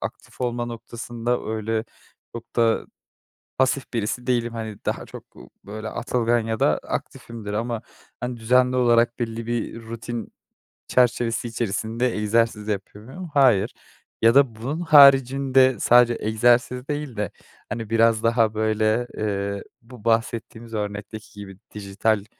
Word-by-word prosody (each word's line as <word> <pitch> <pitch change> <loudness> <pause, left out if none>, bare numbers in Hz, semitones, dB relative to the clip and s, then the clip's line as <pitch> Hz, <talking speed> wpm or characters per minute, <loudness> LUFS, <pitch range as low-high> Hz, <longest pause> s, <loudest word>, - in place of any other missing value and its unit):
aktif - - -8
olma 120 -1 -1
noktasında 120 +1 -4
öyle 110 +1 -2 0.5
çok 115 0 -10
da 115 -1 +2 0.7
pasif 130 0 +1
birisi 115 +1 -2
değilim. 120 -2 0
Hani, 110 -2 -5
daha - - -2
çok, - - -11
ııı, - - -13 0.2
böyle 110 +2 -6
atılgan 120 0 0
ya 110 0 -3
da 75 - +3
aktifimdir 110 -3 -6
ama, 115 +1 -2 0.4
hani, 125 0 -3
düzenli 125 +3 +3
olarak 120 -1 +3
belli 115 -1 -4
bir 120 -1 -3
rutin 115 0 -6 0.6
çerçevesi 120 -1 +1
içerisinde 115 +2 -2
egzersiz 105 0 +1
yapıyor 105 0 -5
muyum? 175 +8 -8
Hayır 120 -7 +4 0.5
ya 115 +3 +5
da 135 -5 +4
bunun 130 +9 -4
haricinde 135 -4 +6
sadece 120 -1 +5
egzersiz 120 +4 +2
değil 145 -4 -4
de, 105 -3 -2 0.4
hani, 110 0 -5
biraz 115 0 +3
daha 115 -2 +2
böyle, 110 +2 +1
eee, 100 -1 -2 0.2
bu 120 -2 -15
bahsettiğimiz 115 0 -1
örnekteki 105 +1 -5
gibi 95 -2 -9 0.2
dijital 105 +1 -1
115 Hz, 130 wpm, -23 LUFS, 110-120 Hz, 0.7 s, haricinde